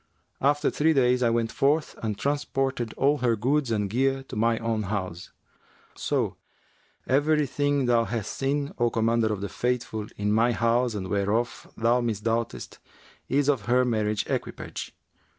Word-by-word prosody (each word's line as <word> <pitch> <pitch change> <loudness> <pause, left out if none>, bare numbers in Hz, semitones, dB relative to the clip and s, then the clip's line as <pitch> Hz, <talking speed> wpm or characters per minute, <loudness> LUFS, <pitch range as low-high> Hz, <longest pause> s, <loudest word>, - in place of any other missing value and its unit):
After 145 +2 +2
three 160 +2 +2
days, 125 -2 +3
I 120 - +3
went 115 -1 0
forth 150 +3 +1
and 110 -3 -2
transported 135 -4 -1
all 145 +2 +2
her 120 -2 +2
goods 135 +5 +1
and 105 -3 0
gear 135 +5 0
to - - -6
my 115 +1 +2
own 115 -1 -1
house; 95 -4 -4 0.6
so - - -1 0.7
every 150 +3 +2
thing 145 0 0
thou 120 -1 +3
hast 110 -1 -3
seen, 140 +1 -1
O 120 0 +3
Commander 115 -1 +1
of 105 -2 -3
the 100 - -2
Faithful, 115 -1 -2
in 105 +1 0
my 115 +2 +3
house 115 +1 +1
and 95 -2 -4
whereof 105 +5 -1
thou 120 +2 +3
misdoubtest, 115 0 -2 0.5
is 140 +1 +2
of 135 -9 +1
her 125 +1 +4
marriage 110 -3 0
equipage. - - -5
120 Hz, 155 wpm, -26 LUFS, 110-135 Hz, 0.7 s, her